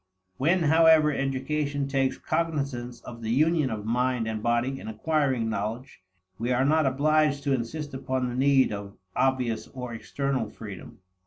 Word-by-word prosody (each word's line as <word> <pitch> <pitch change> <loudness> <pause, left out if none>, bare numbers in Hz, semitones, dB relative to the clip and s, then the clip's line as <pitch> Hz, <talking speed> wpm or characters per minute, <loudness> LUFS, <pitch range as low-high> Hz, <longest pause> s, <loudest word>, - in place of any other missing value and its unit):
When, 170 +6 +2
however, 160 0 +5
education 140 +1 -1
takes 135 -1 0
cognizance 140 -7 -2
of 115 -1 -10
the 110 - -4
union 155 +3 +3
of 105 -2 -4
mind 125 0 0
and 110 -1 -3
body 120 +4 0
in - - -9
acquiring 130 +1 0
knowledge, 110 +2 -4 0.4
we 120 +3 -1
are 125 +2 +2
not 155 0 +3
obliged 145 +1 +2
to 140 -1 +1
insist 140 +4 -3
upon 130 -1 -2
the 120 - -4
need 135 -2 +3
of 100 -1 -7 0.2
obvious, 125 -4 0
or 125 -2 -7
external, 130 0 -2
freedom. 100 -4 -10
130 Hz, 155 wpm, -27 LUFS, 120-145 Hz, 0.4 s, however